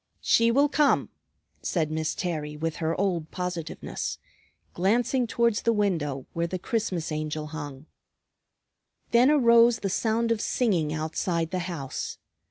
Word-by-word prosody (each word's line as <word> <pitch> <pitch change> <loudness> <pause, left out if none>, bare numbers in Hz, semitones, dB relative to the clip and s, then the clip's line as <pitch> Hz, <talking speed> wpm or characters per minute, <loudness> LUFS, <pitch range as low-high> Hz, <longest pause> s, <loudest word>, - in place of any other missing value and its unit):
"She 230 0 +4
will 280 +5 +4
come," 290 0 +2 0.5
said 160 -4 -1
Miss 155 0 -1
Terry 150 -4 -3
with 160 +1 -3
her 165 +1 -1
old 175 -5 0
positiveness, 180 -3 -4 0.6
glancing 235 +7 +1
towards 235 -1 +1
the 230 - +2
window 160 - -1
where 170 0 -1
the 185 - -3
Christmas 180 -4 -2
Angel 155 0 -3
hung. 145 -2 -7 1.3
Then 240 +3 +6
arose 235 -5 +5
the 195 - -1
sound 230 +3 +1
of 225 -2 +1
singing 180 -11 +1
outside 165 +2 -1
the 185 - -1
house. 140 -7 -5
180 Hz, 135 wpm, -27 LUFS, 155-230 Hz, 1.3 s, Then